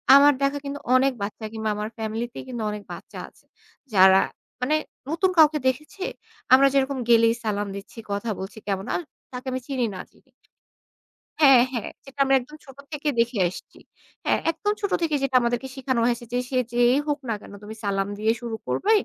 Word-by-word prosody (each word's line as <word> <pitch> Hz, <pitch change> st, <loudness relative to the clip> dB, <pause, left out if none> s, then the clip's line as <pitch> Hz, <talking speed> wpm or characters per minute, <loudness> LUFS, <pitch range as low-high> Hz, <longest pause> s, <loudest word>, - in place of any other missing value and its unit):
আমার 285 Hz, +1 st, +7 dB
দেখা 275 Hz, +1 st, +1 dB
কিন্তু 280 Hz, +1 st, -4 dB, 0.2 s
অনেক 270 Hz, +1 st, +4 dB
বাচ্চা 215 Hz, +2 st, -5 dB
কিংবা 220 Hz, -1 st, -2 dB
আমার 210 Hz, +1 st, -3 dB
ফ্যামিলি 220 Hz, +1 st, -2 dB
তে -, -, -7 dB
কিন্তু 240 Hz, -3 st, -4 dB
অনেক 210 Hz, 0 st, -5 dB
বাচ্চা -, -, -10 dB
আছে, -, -, -27 dB, 0.5 s
যারা 190 Hz, 0 st, +7 dB, 0.4 s
মানে 275 Hz, +5 st, +2 dB, 0.3 s
নতুন 335 Hz, +4 st, +2 dB
কাউকে 310 Hz, -1 st, +6 dB
দেখেছে, 305 Hz, +9 st, -2 dB, 0.5 s
আমরা 275 Hz, +1 st, +8 dB
যেরকম 275 Hz, 0 st, +1 dB
গেলেই 230 Hz, -1 st, +6 dB
সালাম 205 Hz, -2 st, -1 dB
দিচ্ছি, 200 Hz, +4 st, -10 dB
কথা 205 Hz, +3 st, -2 dB
বলছি 190 Hz, +3 st, -7 dB
কেমন 195 Hz, -1 st, -2 dB
আর -, -, -1 dB, 0.3 s
তাকে 250 Hz, +1 st, -7 dB
আমি 255 Hz, -, -2 dB
চিনি 260 Hz, -3 st, 0 dB
না 185 Hz, -, -5 dB
চিনি। 265 Hz, -, -28 dB, 1.1 s
হ্যাঁ, 270 Hz, -4 st, +8 dB
হ্যাঁ। 230 Hz, -4 st, -3 dB, 0.2 s
যেটা 275 Hz, +1 st, -14 dB
আমরা 270 Hz, 0 st, +3 dB
একদম 300 Hz, +5 st, -12 dB
ছোট 270 Hz, -1 st, -14 dB
থেকে 295 Hz, 0 st, -4 dB
দেখে 235 Hz, -1 st, +1 dB
আসছি। 185 Hz, -, -12 dB, 0.5 s
হ্যাঁ -, -, +2 dB
একদম 370 Hz, +6 st, -1 dB
ছোট 405 Hz, -, -1 dB
থেকে 315 Hz, -3 st, +1 dB
যেটা 270 Hz, -1 st, 0 dB
আমাদেরকে 240 Hz, +2 st, -1 dB
শেখানো 260 Hz, -2 st, -1 dB
হয়েছে 240 Hz, 0 st, 0 dB
যে 245 Hz, -, +1 dB
সে 260 Hz, -, -1 dB, 0.2 s
যেই 245 Hz, +2 st, +4 dB
হোক 295 Hz, 0 st, 0 dB
না -, -, +1 dB
কেন -, -, -12 dB
তুমি 215 Hz, +1 st, -8 dB
সালাম 195 Hz, -1 st, 0 dB
দিয়ে 220 Hz, +1 st, +3 dB
শুরু 235 Hz, -2 st, -4 dB
করবে 420 Hz, -, +1 dB
250 Hz, 190 wpm, -24 LUFS, 220-275 Hz, 1.1 s, আমরা